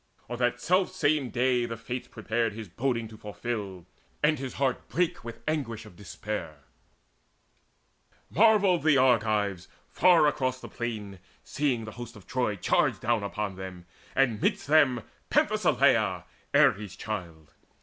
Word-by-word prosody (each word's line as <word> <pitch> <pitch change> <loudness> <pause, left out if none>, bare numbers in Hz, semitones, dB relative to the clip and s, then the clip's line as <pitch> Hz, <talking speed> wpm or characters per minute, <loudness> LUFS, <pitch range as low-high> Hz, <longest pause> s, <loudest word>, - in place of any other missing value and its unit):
On 120 +1 -5
that 120 0 +1
selfsame 155 -5 +1
day 125 -1 +1
The 115 -1 -5
Fates 120 +3 -5
prepared 110 0 -2
his 110 0 -7
boding 115 +4 -2
to 110 - -12
fulfil; 105 -4 -5 0.4
And 150 -1 +3
his 130 -1 -5
heart 135 -2 -1
brake 160 -5 0
with 115 0 -9
anguish 120 -8 -2
of 105 - -14
despair. 100 -6 -6 1.7
Marvelled 205 -4 +4
the 155 -2 +4
Argives, 110 -7 +2 0.2
far 175 -4 +5
across 130 -3 0
the - - -10
plain 105 -5 -5 0.2
Seeing 130 -6 -1
the 110 - -7
hosts 120 0 -9
of 100 -4 -14
Troy 125 -3 -1
charge 100 - +1
down 115 -2 0
on 100 -1 -3
them, 95 -2 -8 0.3
And 125 -6 +2
midst - - +1
them 140 -6 +4 0.3
Penthesileia, - - +2 0.3
Ares' 100 -2 +3
child. 85 -8 -6
120 Hz, 140 wpm, -28 LUFS, 105-135 Hz, 1.7 s, far